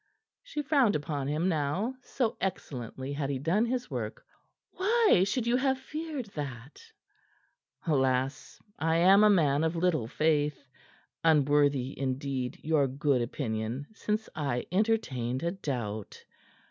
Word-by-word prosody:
She 395 Hz, -12 st, -5 dB
frowned 270 Hz, -6 st, +3 dB
upon 145 Hz, -2 st, -2 dB
him 155 Hz, +5 st, 0 dB
now, 165 Hz, -, 0 dB
so 250 Hz, -2 st, -1 dB
excellently 135 Hz, -, -4 dB
had 140 Hz, -1 st, -2 dB
he 140 Hz, -, -1 dB
done 175 Hz, -, +1 dB
his 250 Hz, 0 st, -2 dB
work. -, -, -5 dB, 0.5 s
"Why 420 Hz, -, +4 dB
should 230 Hz, +4 st, -1 dB
you 235 Hz, +1 st, +2 dB
have 265 Hz, 0 st, +1 dB
feared 305 Hz, -1 st, -5 dB
that?" 135 Hz, -4 st, -7 dB, 1.0 s
"Alas! 135 Hz, -3 st, 0 dB, 0.2 s
I 160 Hz, 0 st, +1 dB
am 190 Hz, +5 st, +6 dB
a 210 Hz, -, +7 dB
man 155 Hz, -7 st, +3 dB
of 160 Hz, +1 st, 0 dB
little 165 Hz, -9 st, +1 dB
faith 150 Hz, 0 st, 0 dB, 0.6 s
unworthy, 145 Hz, -4 st, +3 dB
indeed, 130 Hz, -1 st, -2 dB
your 150 Hz, -3 st, +3 dB
good 135 Hz, -1 st, +1 dB
opinion 120 Hz, +1 st, -3 dB
since 215 Hz, 0 st, -2 dB
I 140 Hz, -6 st, -1 dB
entertained 155 Hz, -, 0 dB
a 170 Hz, -, 0 dB
doubt. 120 Hz, -, -5 dB
150 Hz, 130 wpm, -29 LUFS, 135-210 Hz, 1.0 s, a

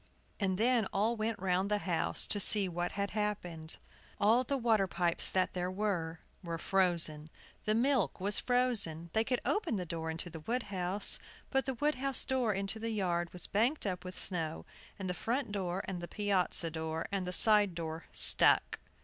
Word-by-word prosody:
And 190 Hz, -3 st, -1 dB
then 230 Hz, -1 st, +2 dB
all 215 Hz, +4 st, 0 dB
went 220 Hz, 0 st, -3 dB
round 185 Hz, +1 st, -1 dB
the 210 Hz, -, +1 dB
house 175 Hz, -5 st, 0 dB
to 205 Hz, -, +1 dB
see 200 Hz, 0 st, +7 dB
what 175 Hz, 0 st, -4 dB
had 200 Hz, 0 st, -3 dB
happened. 180 Hz, -7 st, -4 dB, 0.4 s
All 225 Hz, +5 st, +3 dB
the 275 Hz, +2 st, -2 dB
water 225 Hz, -5 st, +1 dB
pipes 175 Hz, -2 st, 0 dB
that 185 Hz, -1 st, 0 dB
there 180 Hz, 0 st, -3 dB
were 185 Hz, -5 st, -3 dB, 0.2 s
were 170 Hz, -1 st, -4 dB
frozen. 170 Hz, -4 st, +1 dB, 0.4 s
The 215 Hz, 0 st, +1 dB
milk 240 Hz, -, +1 dB
was 200 Hz, +2 st, 0 dB
frozen. 205 Hz, -10 st, 0 dB
They 220 Hz, -, +2 dB
could 250 Hz, +1 st, -2 dB
open 415 Hz, -, -1 dB
the 185 Hz, -3 st, -3 dB
door 160 Hz, -1 st, -5 dB
into 165 Hz, +2 st, -4 dB
the 160 Hz, -, -8 dB
wood 235 Hz, +10 st, -3 dB
house; 185 Hz, +2 st, +1 dB, 0.3 s
but 270 Hz, -1 st, 0 dB
the 265 Hz, -, -2 dB
wood 295 Hz, +5 st, 0 dB
house 275 Hz, -1 st, -1 dB
door 255 Hz, -4 st, 0 dB
into 195 Hz, +2 st, -3 dB
the 230 Hz, +1 st, -4 dB
yard 175 Hz, -5 st, -2 dB
was 180 Hz, -, -4 dB
banked 235 Hz, +9 st, 0 dB
up 180 Hz, -2 st, -3 dB
with 185 Hz, 0 st, -9 dB
snow; 165 Hz, -4 st, -3 dB, 0.3 s
and 190 Hz, -, -5 dB
the 180 Hz, -, -2 dB
front 235 Hz, +4 st, -3 dB
door, 190 Hz, -2 st, -3 dB
and 180 Hz, -3 st, -5 dB
the 175 Hz, -, -6 dB
piazza 190 Hz, -5 st, 0 dB
door, 160 Hz, 0 st, -4 dB
and 195 Hz, -2 st, -3 dB
the -, -, -3 dB
side 205 Hz, -1 st, +5 dB
door 160 Hz, -1 st, -6 dB
stuck. -, -, +7 dB
195 Hz, 190 wpm, -32 LUFS, 175-220 Hz, 0.4 s, see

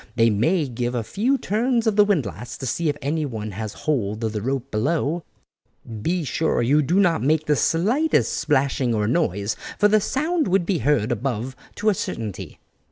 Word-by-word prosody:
They 115 Hz, -1 st, +4 dB
may 150 Hz, -, +1 dB
give 120 Hz, 0 st, -3 dB
a 120 Hz, -, -1 dB
few 235 Hz, -, 0 dB
turns 235 Hz, +2 st, 0 dB
of 220 Hz, -2 st, +2 dB
the 210 Hz, -, +7 dB
windlass 125 Hz, -, -2 dB
to 135 Hz, -, -6 dB
see 160 Hz, +6 st, 0 dB
if 145 Hz, -, -2 dB
anyone 135 Hz, -8 st, -2 dB
has 105 Hz, +2 st, -5 dB
hold 115 Hz, -7 st, -1 dB
of 110 Hz, -1 st, -1 dB
the 105 Hz, -, -3 dB
rope 135 Hz, +2 st, -3 dB
below; 150 Hz, +8 st, 0 dB, 0.8 s
be 175 Hz, +8 st, 0 dB
sure 150 Hz, -1 st, 0 dB
you 145 Hz, +6 st, +4 dB
do 170 Hz, +7 st, +2 dB
not 175 Hz, -5 st, +3 dB
make 155 Hz, +3 st, +2 dB
the 150 Hz, -, +2 dB
slightest 195 Hz, -, +2 dB
splashing 130 Hz, -3 st, +1 dB
or 105 Hz, -1 st, 0 dB
noise, 105 Hz, -, 0 dB, 0.2 s
for 205 Hz, -, +5 dB
the 215 Hz, 0 st, +3 dB
sound 310 Hz, -, 0 dB
would 185 Hz, -1 st, +2 dB
be 180 Hz, -1 st, 0 dB
heard 125 Hz, -3 st, +1 dB
above 120 Hz, +1 st, -2 dB, 0.2 s
to 215 Hz, -, +1 dB
a -, -, +3 dB
certainty." 110 Hz, -, -5 dB
145 Hz, 185 wpm, -23 LUFS, 115-180 Hz, 0.8 s, the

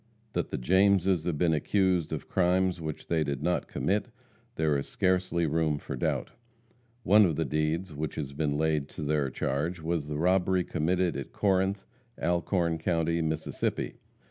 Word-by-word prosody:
That -, -, -1 dB
the -, -, -3 dB
Jameses 95 Hz, +2 st, +3 dB
have 85 Hz, -4 st, -1 dB
been 85 Hz, +1 st, +2 dB
accused 90 Hz, +1 st, +1 dB
of -, -, -4 dB
crimes 90 Hz, -1 st, +1 dB
which 80 Hz, -1 st, -5 dB
they 80 Hz, -2 st, +1 dB
did 70 Hz, -1 st, -3 dB
not 90 Hz, +1 st, 0 dB
commit, 100 Hz, +2 st, -1 dB, 0.5 s
there 80 Hz, -2 st, +1 dB
is 70 Hz, -, -2 dB
scarcely 90 Hz, -2 st, +1 dB
room 80 Hz, -1 st, +1 dB
for 70 Hz, -, -6 dB
doubt. 60 Hz, -, -1 dB, 0.7 s
One 105 Hz, +2 st, +6 dB
of 85 Hz, -6 st, +2 dB
the 80 Hz, -, 0 dB
deeds 75 Hz, +4 st, -1 dB
which 75 Hz, 0 st, -4 dB
has 70 Hz, -3 st, -4 dB
been 75 Hz, 0 st, -1 dB
laid 75 Hz, -2 st, 0 dB
to 80 Hz, -, -7 dB
their 75 Hz, -2 st, +1 dB
charge 75 Hz, +7 st, -2 dB
was 80 Hz, -2 st, -2 dB
the 75 Hz, -1 st, -3 dB
robbery 90 Hz, +2 st, +2 dB
committed 85 Hz, +2 st, 0 dB
at -, -, -5 dB
Corinth, 95 Hz, 0 st, +1 dB, 0.3 s
Alcorn 85 Hz, -1 st, 0 dB
county, 85 Hz, 0 st, 0 dB
Mississippi. 80 Hz, 0 st, -2 dB
85 Hz, 165 wpm, -29 LUFS, 75-90 Hz, 0.7 s, One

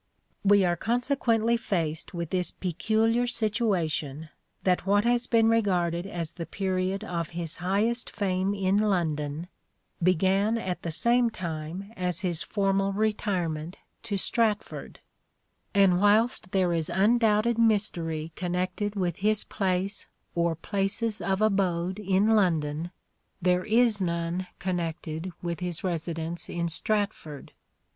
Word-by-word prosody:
We 200 Hz, -1 st, +5 dB
are 175 Hz, -1 st, +2 dB
consequently 235 Hz, +1 st, +1 dB
faced 165 Hz, -8 st, -2 dB
with 170 Hz, -2 st, -5 dB
this 180 Hz, -1 st, +1 dB
peculiar 220 Hz, +6 st, 0 dB
uncertain 245 Hz, 0 st, -1 dB
situation 160 Hz, -, -1 dB, 0.3 s
that 185 Hz, 0 st, +1 dB
what 205 Hz, +1 st, +4 dB
has 240 Hz, +1 st, +1 dB
been 225 Hz, -1 st, +4 dB
regarded 180 Hz, -6 st, +1 dB
as 170 Hz, -6 st, -4 dB
the 170 Hz, -3 st, -7 dB
period 190 Hz, +1 st, -1 dB
habitati°n 220 Hz, -, -7 dB
of 170 Hz, -, -3 dB
his 170 Hz, -2 st, -4 dB
highest 205 Hz, +7 st, 0 dB
fame 195 Hz, -1 st, -1 dB
in 195 Hz, 0 st, +1 dB
London, 165 Hz, -6 st, 0 dB, 0.5 s
began 190 Hz, +5 st, +3 dB
at 180 Hz, -6 st, -3 dB
the 170 Hz, -, -4 dB
same 235 Hz, +8 st, +3 dB
time 175 Hz, +2 st, -6 dB
as 180 Hz, -1 st, -2 dB
his 175 Hz, -4 st, 0 dB
formal 195 Hz, -1 st, 0 dB
retirement 185 Hz, -6 st, -1 dB, 0.2 s
to 215 Hz, -3 st, -2 dB
Stratford; 215 Hz, +1 st, -1 dB, 0.7 s
and 195 Hz, -2 st, +4 dB
whilst 210 Hz, 0 st, +3 dB
there 185 Hz, -3 st, +2 dB
is 165 Hz, 0 st, 0 dB
undoubted 215 Hz, +4 st, +3 dB
mystery 170 Hz, -8 st, +1 dB
connected 185 Hz, +3 st, -2 dB
with 180 Hz, -4 st, -1 dB
his 210 Hz, +1 st, +1 dB
place 195 Hz, 0 st, -2 dB, 0.3 s
or 170 Hz, -1 st, +1 dB
places 200 Hz, +5 st, 0 dB
of 195 Hz, +1 st, 0 dB
abode 190 Hz, -2 st, +1 dB
in 195 Hz, +1 st, +2 dB
London, 165 Hz, -6 st, +1 dB, 0.5 s
there 180 Hz, 0 st, +2 dB
is 220 Hz, -1 st, +3 dB
none 170 Hz, +1 st, -1 dB
connected 170 Hz, -1 st, -3 dB
with 170 Hz, -2 st, -3 dB
his 180 Hz, -3 st, 0 dB
residence 165 Hz, -1 st, -3 dB
in 170 Hz, -1 st, -2 dB
Stratford. 200 Hz, -5 st, -2 dB
190 Hz, 130 wpm, -27 LUFS, 170-210 Hz, 0.7 s, We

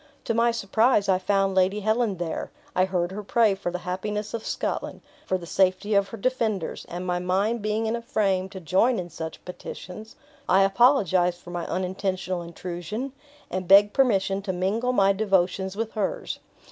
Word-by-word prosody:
To -, -, -1 dB
my 230 Hz, +1 st, +3 dB
surprise, 225 Hz, 0 st, +2 dB
I 185 Hz, -1 st, +3 dB
found 195 Hz, 0 st, +1 dB
Lady 190 Hz, +2 st, +2 dB
Helen 220 Hz, -1 st, +1 dB
there, 170 Hz, -2 st, -3 dB, 0.3 s
I 185 Hz, -, +4 dB
heard 180 Hz, -2 st, -1 dB
her 205 Hz, +2 st, -5 dB
pray 215 Hz, 0 st, +3 dB
for 195 Hz, -2 st, -3 dB
the 180 Hz, -, -2 dB
happiness 210 Hz, +3 st, -3 dB
of 230 Hz, -1 st, -3 dB
Scotland, -, -, -3 dB, 0.3 s
for 185 Hz, -, +1 dB
the 175 Hz, -, -9 dB
safety 190 Hz, +4 st, +1 dB
of 200 Hz, -1 st, +3 dB
her 225 Hz, -, -7 dB
defenders; 220 Hz, -6 st, -1 dB
and 175 Hz, +1 st, -5 dB
my 180 Hz, -1 st, 0 dB
mind 195 Hz, +6 st, 0 dB
being 215 Hz, +2 st, -1 dB
in 220 Hz, +1 st, 0 dB
a 235 Hz, -, -4 dB
frame 195 Hz, -5 st, 0 dB
to 190 Hz, -1 st, -8 dB
join 190 Hz, +8 st, +2 dB
in 175 Hz, -1 st, -5 dB
such 160 Hz, 0 st, -7 dB
petitions, 180 Hz, +3 st, -9 dB, 0.3 s
I 190 Hz, +2 st, +6 dB
apologized 195 Hz, -, +3 dB
for 175 Hz, -, -11 dB
my 175 Hz, -1 st, -4 dB
unintentional 185 Hz, 0 st, -2 dB
intrusion, 175 Hz, +8 st, -5 dB, 0.4 s
and 185 Hz, 0 st, -3 dB
begged 200 Hz, +2 st, +7 dB
permission 195 Hz, -7 st, +2 dB
to 195 Hz, -1 st, -3 dB
mingle 200 Hz, +7 st, 0 dB
my 195 Hz, -5 st, +4 dB
devotions 190 Hz, -1 st, +1 dB
with 225 Hz, 0 st, -2 dB
hers. -, -, -3 dB
195 Hz, 180 wpm, -25 LUFS, 185-220 Hz, 0.4 s, begged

